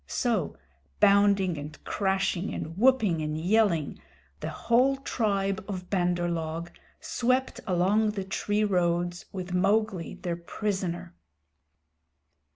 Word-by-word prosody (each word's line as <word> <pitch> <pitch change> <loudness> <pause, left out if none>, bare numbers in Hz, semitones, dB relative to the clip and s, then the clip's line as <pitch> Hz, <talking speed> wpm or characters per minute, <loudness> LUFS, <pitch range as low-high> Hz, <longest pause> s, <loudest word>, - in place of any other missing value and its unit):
So, - - -1 0.4
bounding 200 -4 +4
and 150 +2 -8
crashing 195 -1 0
and 160 +1 -5
whooping 215 -7 +3
and 155 0 -2
yelling, 180 -4 +2 0.4
the - - -4
whole 255 +4 +2
tribe 200 -7 -1
of 185 -3 -6
Bandar 175 -2 +1
log 165 0 -3 0.3
swept 255 +2 0
along 200 +4 +2
the 195 -2 -3
tree 205 +2 -1
roads 175 -2 0
with 185 -2 -5
Mowgli 200 -1 +1
their 170 -1 -4
prisoner. 185 - -3
190 Hz, 110 wpm, -28 LUFS, 175-210 Hz, 0.4 s, bounding